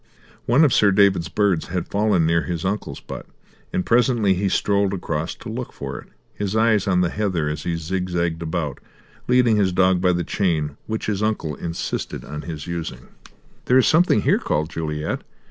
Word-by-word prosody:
One 135 Hz, +7 st, +5 dB
of 135 Hz, -, +2 dB
Sir 105 Hz, -, +5 dB
David's 95 Hz, -5 st, +3 dB
birds 100 Hz, -4 st, +1 dB
had 90 Hz, -1 st, -3 dB
fallen 100 Hz, -5 st, +2 dB
near 85 Hz, +1 st, +3 dB
his 85 Hz, 0 st, -4 dB
uncle's 100 Hz, +3 st, -3 dB
butt, -, -, -8 dB, 0.4 s
and 90 Hz, -, -1 dB
presently 120 Hz, -4 st, +3 dB
he 95 Hz, +2 st, 0 dB
strolled 100 Hz, 0 st, +1 dB
across 80 Hz, -2 st, -3 dB
to -, -, -11 dB
look 115 Hz, +3 st, -5 dB
for -, -, -6 dB
it, -, -, -13 dB, 0.3 s
his 105 Hz, 0 st, -3 dB
eyes 110 Hz, -2 st, +3 dB
on 90 Hz, -2 st, +3 dB
the 85 Hz, -1 st, +1 dB
heather 95 Hz, -7 st, -1 dB
as 75 Hz, 0 st, -3 dB
he 85 Hz, -, 0 dB
zigzagged 85 Hz, 0 st, -2 dB
about, 80 Hz, -4 st, -3 dB, 0.5 s
leading 125 Hz, -3 st, +4 dB
his 95 Hz, -3 st, +2 dB
dog 95 Hz, 0 st, +3 dB
by 90 Hz, -1 st, +3 dB
the 85 Hz, 0 st, -1 dB
chain 80 Hz, -8 st, -1 dB
which 110 Hz, 0 st, -3 dB
his 105 Hz, -2 st, -1 dB
uncle 105 Hz, -8 st, -1 dB
insisted 85 Hz, +3 st, -4 dB
on 75 Hz, 0 st, -6 dB
his 80 Hz, -3 st, -6 dB
using. 85 Hz, -8 st, -6 dB, 0.6 s
"There 125 Hz, -, +4 dB
is 130 Hz, -, +5 dB
something 160 Hz, -, +4 dB
here," -, -, +3 dB
called 75 Hz, +2 st, -1 dB
Juliet. 75 Hz, -1 st, -3 dB
95 Hz, 185 wpm, -22 LUFS, 85-105 Hz, 0.6 s, One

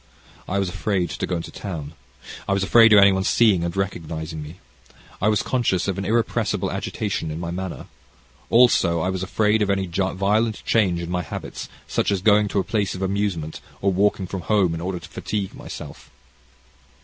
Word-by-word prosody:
"I 100 Hz, -, -1 dB
was 100 Hz, -1 st, +1 dB
afraid 90 Hz, -1 st, -1 dB
to -, -, -3 dB
go 90 Hz, -, -1 dB
into 85 Hz, -, -5 dB
town, 80 Hz, -7 st, -6 dB, 0.5 s
I 100 Hz, -, +2 dB
was 100 Hz, 0 st, +1 dB
afraid 115 Hz, +4 st, +6 dB
of 105 Hz, -, +8 dB
any 100 Hz, 0 st, +8 dB
one's 95 Hz, 0 st, 0 dB
seeing 105 Hz, -7 st, +4 dB
and 85 Hz, +1 st, -3 dB
recognizing 80 Hz, -4 st, -3 dB
me. 75 Hz, +4 st, -10 dB, 0.6 s
I 100 Hz, -, +2 dB
was 105 Hz, -2 st, +2 dB
conscious 105 Hz, -8 st, 0 dB
of 95 Hz, -1 st, -1 dB
an 100 Hz, -, -3 dB
irrepressible 115 Hz, +3 st, 0 dB
agitation 100 Hz, -6 st, -3 dB
in 80 Hz, +1 st, -5 dB
my 85 Hz, 0 st, -4 dB
manner. 95 Hz, 0 st, -5 dB, 0.6 s
Also, 115 Hz, -8 st, +4 dB
I 95 Hz, -, 0 dB
was 95 Hz, -1 st, -3 dB
afraid 105 Hz, +3 st, +1 dB
of 105 Hz, -, +1 dB
any 95 Hz, -1 st, +1 dB
violent 100 Hz, +5 st, 0 dB
change 95 Hz, -7 st, +2 dB
in 85 Hz, 0 st, -5 dB
my 90 Hz, 0 st, 0 dB
habits, -, -, -7 dB, 0.2 s
such -, -, 0 dB
as 95 Hz, -2 st, -1 dB
going 105 Hz, 0 st, +5 dB
to 100 Hz, -, 0 dB
a -, -, +1 dB
place 100 Hz, -3 st, -1 dB
of 95 Hz, -, -4 dB
amusement, 95 Hz, -5 st, -2 dB, 0.2 s
or 100 Hz, -1 st, +1 dB
walking 100 Hz, 0 st, +2 dB
from 95 Hz, +1 st, -5 dB
home 95 Hz, -3 st, +2 dB
in 85 Hz, -, -4 dB
order 90 Hz, +1 st, -3 dB
to -, -, -10 dB
fatigue 100 Hz, -3 st, -4 dB
myself. -, -, -9 dB
95 Hz, 195 wpm, -23 LUFS, 85-105 Hz, 0.6 s, of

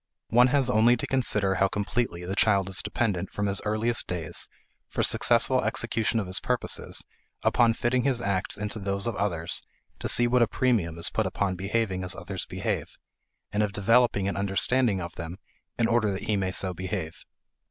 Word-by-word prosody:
One 120 Hz, +2 st, +6 dB
has 135 Hz, 0 st, +2 dB
only 120 Hz, 0 st, +4 dB
to -, -, -3 dB
consider 105 Hz, -7 st, +1 dB
how 95 Hz, +1 st, +2 dB
completely 100 Hz, -3 st, -2 dB
the 95 Hz, +2 st, -3 dB
child 100 Hz, -3 st, +3 dB
is 95 Hz, -, +1 dB
dependent 100 Hz, -6 st, -2 dB
from 105 Hz, -, -2 dB
his 100 Hz, 0 st, 0 dB
earliest 110 Hz, +3 st, 0 dB
days 85 Hz, -1 st, -4 dB, 0.4 s
for -, -, -2 dB
successful -, -, +3 dB
execution 115 Hz, 0 st, 0 dB
of 105 Hz, -, -2 dB
his 90 Hz, +1 st, -1 dB
purposes 125 Hz, -1 st, -2 dB, 0.4 s
upon 115 Hz, -2 st, +3 dB
fitting 125 Hz, +2 st, +1 dB
his 130 Hz, -2 st, +1 dB
acts 100 Hz, -4 st, -1 dB
into 105 Hz, +1 st, -4 dB
those 100 Hz, +1 st, -2 dB
of 115 Hz, -3 st, -2 dB
others 85 Hz, -4 st, -2 dB, 0.4 s
to -, -, -2 dB
see 120 Hz, -, +4 dB
what 125 Hz, +1 st, +3 dB
a 120 Hz, -, +5 dB
premium 105 Hz, -10 st, 0 dB
is 85 Hz, -, 0 dB
put -, -, 0 dB
upon 100 Hz, -2 st, -1 dB
behaving 95 Hz, 0 st, -1 dB
as 90 Hz, +1 st, -1 dB
others 95 Hz, +1 st, -5 dB
behave, -, -, -3 dB, 0.6 s
and 105 Hz, -, 0 dB
of 105 Hz, -2 st, 0 dB
developing 105 Hz, -1 st, +3 dB
an 100 Hz, -, -2 dB
understanding 100 Hz, +2 st, +2 dB
of 85 Hz, -1 st, -6 dB
them 85 Hz, +2 st, -6 dB, 0.4 s
in 115 Hz, -, +2 dB
order 115 Hz, -2 st, +2 dB
that 95 Hz, -1 st, -3 dB
he 105 Hz, -, 0 dB
may 95 Hz, -2 st, -1 dB
so 95 Hz, 0 st, 0 dB
behave. 90 Hz, -2 st, -5 dB
100 Hz, 185 wpm, -27 LUFS, 95-115 Hz, 0.6 s, One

